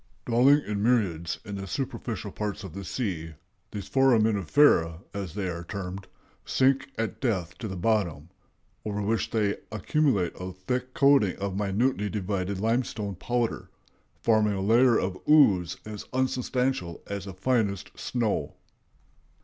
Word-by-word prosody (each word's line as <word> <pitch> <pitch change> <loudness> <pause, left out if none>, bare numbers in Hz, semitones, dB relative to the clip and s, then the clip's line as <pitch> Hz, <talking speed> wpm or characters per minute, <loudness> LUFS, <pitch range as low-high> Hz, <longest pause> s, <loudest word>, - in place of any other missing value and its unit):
"Dwelling 130 +5 +5
in 105 -1 -2
myriads 100 -8 +1
in 100 0 -5
the 95 0 -6
superficial 120 -3 -4
parts 105 0 -4
of 95 -5 -8
the 100 +1 -6
sea, 85 -10 -3 0.3
these 100 -2 -6
foraminifera, 110 - +3
as 100 -4 -5
they 100 -3 -2
are 85 -1 -4
termed, 95 +1 -6 0.4
sink 135 +1 +2
at 110 -4 -3
death 95 -10 -1
to 115 - -4
the 95 - -5
bottom, 90 -6 0 0.5
over 105 -1 -3
which 110 +2 0
they 105 -3 0
accumulate 110 - +1
a 90 0 -5
thick 125 +8 -4
coating 140 -9 +4
of 100 -1 -4
minutely 105 +2 0
divided 100 -1 -2
limestone 110 -2 -1
powder, 120 +5 -2 0.5
forming 110 -2 +3
a 95 - -2
layer 115 +4 +5
of 95 0 -2
ooze 95 - +5
as 105 -1 -7
unsubstantial 130 -7 -1
as 100 -1 -5
the 95 - -7
finest 100 -2 0
snow." 115 -4 -2
105 Hz, 140 wpm, -27 LUFS, 95-120 Hz, 0.5 s, Dwelling